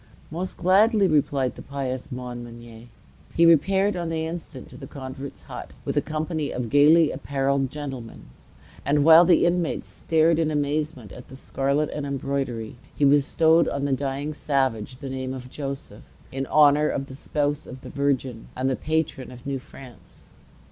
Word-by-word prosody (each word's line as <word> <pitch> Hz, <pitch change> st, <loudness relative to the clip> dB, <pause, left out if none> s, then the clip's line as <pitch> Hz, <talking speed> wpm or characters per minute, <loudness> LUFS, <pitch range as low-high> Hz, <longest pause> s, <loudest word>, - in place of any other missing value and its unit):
"Most 180 Hz, +4 st, -4 dB
gladly," 200 Hz, +4 st, +4 dB
replied 140 Hz, -5 st, +1 dB
the -, -, -11 dB
pious 130 Hz, -2 st, -5 dB
Montmagny. 120 Hz, -2 st, -8 dB, 0.5 s
He 170 Hz, -, +5 dB
repaired 190 Hz, +5 st, +4 dB
on 170 Hz, -2 st, -3 dB
the 160 Hz, -1 st, -2 dB
instant 160 Hz, -5 st, -7 dB
to -, -, -13 dB
the -, -, -9 dB
convert's 135 Hz, 0 st, -8 dB
hut, -, -, -9 dB
with -, -, -2 dB
a -, -, +3 dB
company 155 Hz, -1 st, -3 dB
of 120 Hz, -3 st, -4 dB
gayly 150 Hz, +2 st, +6 dB
apparelled 135 Hz, 0 st, -1 dB
gentlemen; 135 Hz, -5 st, -7 dB, 0.6 s
and 145 Hz, 0 st, +2 dB
while 165 Hz, +3 st, +8 dB
the 175 Hz, -, +4 dB
inmates 175 Hz, -1 st, 0 dB
stared 160 Hz, 0 st, +2 dB
in 160 Hz, -1 st, +1 dB
amazement 145 Hz, -5 st, -2 dB
at 125 Hz, -, -11 dB
the 130 Hz, -, -12 dB
scarlet 140 Hz, +2 st, -1 dB
and 145 Hz, -1 st, -4 dB
embroidery, 135 Hz, -4 st, -3 dB, 0.2 s
he 145 Hz, -, +2 dB
bestowed 160 Hz, +4 st, +4 dB
on 140 Hz, 0 st, -2 dB
the 140 Hz, -, +1 dB
dying 140 Hz, +2 st, -2 dB
savage 130 Hz, -6 st, -1 dB
the 135 Hz, -, -8 dB
name 130 Hz, 0 st, -4 dB
of 125 Hz, -1 st, -9 dB
Joseph, 140 Hz, -2 st, -6 dB, 0.3 s
in 135 Hz, 0 st, -3 dB
honor 150 Hz, 0 st, +5 dB
of 135 Hz, -, -2 dB
the 135 Hz, -, -11 dB
spouse 145 Hz, +1 st, -2 dB
of 130 Hz, +1 st, -10 dB
the -, -, -9 dB
Virgin 135 Hz, -4 st, -1 dB
and 130 Hz, +1 st, 0 dB
the -, -, 0 dB
patron 155 Hz, -4 st, -2 dB
of 125 Hz, -1 st, -13 dB
New 140 Hz, -1 st, -2 dB
France. 130 Hz, -1 st, -14 dB
140 Hz, 170 wpm, -24 LUFS, 130-155 Hz, 0.6 s, while